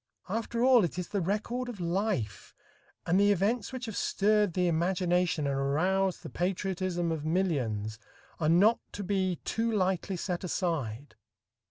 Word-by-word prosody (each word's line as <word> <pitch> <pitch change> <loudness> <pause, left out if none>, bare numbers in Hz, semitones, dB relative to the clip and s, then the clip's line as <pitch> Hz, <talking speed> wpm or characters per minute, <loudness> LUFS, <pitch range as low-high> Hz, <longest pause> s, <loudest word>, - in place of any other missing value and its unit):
After 230 +3 -1
all, 255 -4 +6
it 175 - -2
is 180 -1 -4
the 200 - -1
record 215 +7 -2
of 225 -5 -7
life, 175 - -2 0.5
and 180 +3 +3
the 205 0 +5
events 205 +4 0
which 255 -1 -5
have 220 -3 -6
stirred 210 -2 +2
the 180 -1 +2
imagination 175 -1 +1
and 140 -1 0
aroused 180 +8 +1
the - - -6
patriotism 180 -1 -1
of 160 -2 -3
millions 130 - -1 0.4
are 155 -2 +1
not 200 +8 +5
to 205 - -5
be 190 -2 0
too 230 0 0
lightly 190 -2 0
set 180 0 -3
aside. 145 - -2
185 Hz, 155 wpm, -30 LUFS, 165-205 Hz, 0.5 s, all